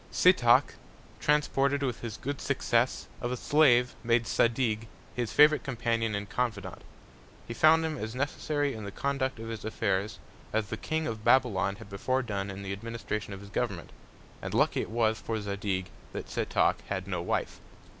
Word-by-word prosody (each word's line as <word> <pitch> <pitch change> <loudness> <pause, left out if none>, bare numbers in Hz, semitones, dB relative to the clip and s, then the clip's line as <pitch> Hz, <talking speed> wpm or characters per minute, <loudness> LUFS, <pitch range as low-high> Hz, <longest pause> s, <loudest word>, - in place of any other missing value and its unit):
Setoc, - - +5 0.5
transported 145 -1 +2
with 125 -4 -2
his 115 -2 -5
good 140 +1 -4
Success, 130 -3 +1 0.2
of 120 - -2
a 125 - -2
Slave 125 -4 +4
made 115 0 +2
Zadig 115 -2 +1 0.3
his 120 -2 -2
Favourite 150 +1 +6
Companion 115 -4 -1
and 100 0 -4
Confident; 105 -7 -3 0.7
he 115 - -4
found 160 +5 +5
him 155 -1 -3
as 110 +2 -5
necessary 145 +1 -1
in 110 - -7
the 100 - -6
Conduct 140 +2 -1
of 115 0 -7
his 115 -2 -6
Affairs, 100 -2 -1 0.4
as 110 -2 0
the 110 - -2
King 160 +7 -2
of 110 -4 -4
Babylon 100 -8 +3
had 100 - -12
before 130 +7 0
done 100 -4 -3
in 95 +1 -6
the 95 0 -3
Administration 110 0 -4
of 100 0 -7
his 100 - -11
Government; 100 -7 -3 0.5
and - - -4
lucky - - +3
it - - -5
was 110 -1 +1
for 110 -1 -3
Zadig 100 -2 -3 0.2
that - - -6
Setoc - - +1
had - - -3
no - - -2
Wife. - - -2
115 Hz, 175 wpm, -29 LUFS, 105-130 Hz, 0.7 s, Favourite